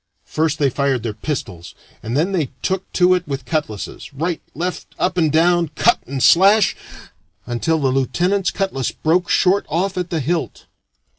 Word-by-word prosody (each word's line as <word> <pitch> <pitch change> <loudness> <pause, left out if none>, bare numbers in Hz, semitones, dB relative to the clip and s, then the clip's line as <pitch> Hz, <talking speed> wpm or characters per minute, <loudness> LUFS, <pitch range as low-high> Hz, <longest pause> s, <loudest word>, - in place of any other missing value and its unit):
First 155 0 -1
they 140 -3 +1
fired 135 -3 0
their 115 -3 -3
pistols, 105 - -5 0.3
and 115 +4 -3
then 170 +6 +1
they 160 -9 -1
took 190 0 -2
to 180 0 +4
it 180 -2 -1
with 135 -3 -4
cutlasses 125 -6 -4
right, 165 +3 -2
left, 180 +2 -5
up 185 - 0
and 160 -4 +2
down, 170 +2 +3
cut 235 - +3
and 135 -1 -3
slash 200 +4 +5 0.7
until 120 +7 0
the 140 -4 +1
lieutenant's 175 +8 +1
cutlass 190 -10 -2
broke 175 +3 0
short 195 +2 +3
off 185 +4 -1
at 180 -1 -3
the 165 - -1
hilt. 160 +4 -3
160 Hz, 165 wpm, -19 LUFS, 135-180 Hz, 0.7 s, slash